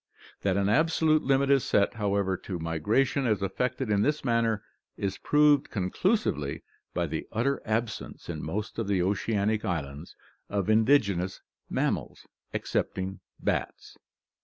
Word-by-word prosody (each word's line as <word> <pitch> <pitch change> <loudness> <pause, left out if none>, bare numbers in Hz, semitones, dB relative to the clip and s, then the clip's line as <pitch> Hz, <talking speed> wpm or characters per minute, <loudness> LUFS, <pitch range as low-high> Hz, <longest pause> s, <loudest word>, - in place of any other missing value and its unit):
That 100 -1 +1
an 100 0 +2
absolute 155 +5 +3
limit 140 +1 +2
is 135 -3 +4
set, 100 - +2
however, 100 -3 0
to 90 0 -5
migration 105 - +1
as 105 -3 +1
effected 125 +4 -1
in 100 -1 +3
this 150 +4 0
manner 115 -3 +1 0.3
is 95 -1 -2
proved 150 -1 +4
conclusively 95 - 0 0.3
by 85 - +1
the 80 0 -4
utter 125 +5 0
absence 110 +1 -3
in 80 -3 -4
most 105 +8 -4
of 115 - -2
the 95 -3 +2
oceanic 105 +2 0
islands 80 -5 -4 0.3
of 100 +1 0
indigenous 110 -6 +3 0.3
mammals, - - -2 0.3
excepting 95 +1 -2 0.2
bats." - - -3
105 Hz, 135 wpm, -28 LUFS, 95-125 Hz, 0.3 s, is